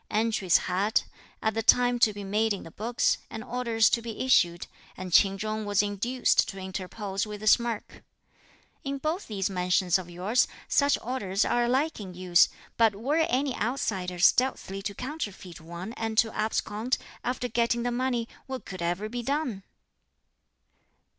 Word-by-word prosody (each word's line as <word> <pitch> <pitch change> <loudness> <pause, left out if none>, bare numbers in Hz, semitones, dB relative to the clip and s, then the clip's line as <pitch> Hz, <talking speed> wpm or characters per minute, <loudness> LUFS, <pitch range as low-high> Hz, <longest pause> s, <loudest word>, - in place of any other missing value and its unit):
Entries 215 -5 +2
had, 195 +5 0 0.4
at 220 - +1
the 225 - -1
time 245 +2 +4
to 225 - +5
be 205 0 -7
made 210 +2 +1
in 200 - -6
the 165 - -11
books, 230 +6 0
and 220 - -6
orders 235 -2 +1
to 235 - +2
be 230 -1 -6
issued, 175 -9 +3 0.3
and 185 -1 -6
Ch'in 195 +1 +5
Chung 215 +1 -3
was 205 0 +2
induced 220 +5 +1
to 195 - -7
interpose 190 +2 -4
with 210 0 -7
a - - -4
smirk, 235 0 +1 0.8
"In 275 0 -3
both 310 +7 -3
these 195 -3 -1
mansions 180 -1 +1
of 180 -1 -9
yours, 190 +8 +1 0.2
such 285 0 +3
orders 210 -6 -1
are 240 0 +2
alike 270 +5 0
in 185 -4 -8
use; 180 -1 +4 0.3
but 225 -3 +4
were 265 +9 -1
any 265 +1 0
outsider 205 -7 -2
stealthily 195 0 +2
to 200 0 -4
counterfeit 205 - -6
one 175 +6 -7
and 225 -2 -4
to 225 0 +3
abscond, 220 +2 -1 0.3
after 250 0 -2
getting 235 0 +1
the 245 - 0
money, 245 -1 -1 0.2
what 260 -1 -6
could 185 -2 -7
ever 175 +5 -1
be 240 +2 -4
done?" 270 -5 -2
220 Hz, 165 wpm, -27 LUFS, 195-245 Hz, 0.8 s, to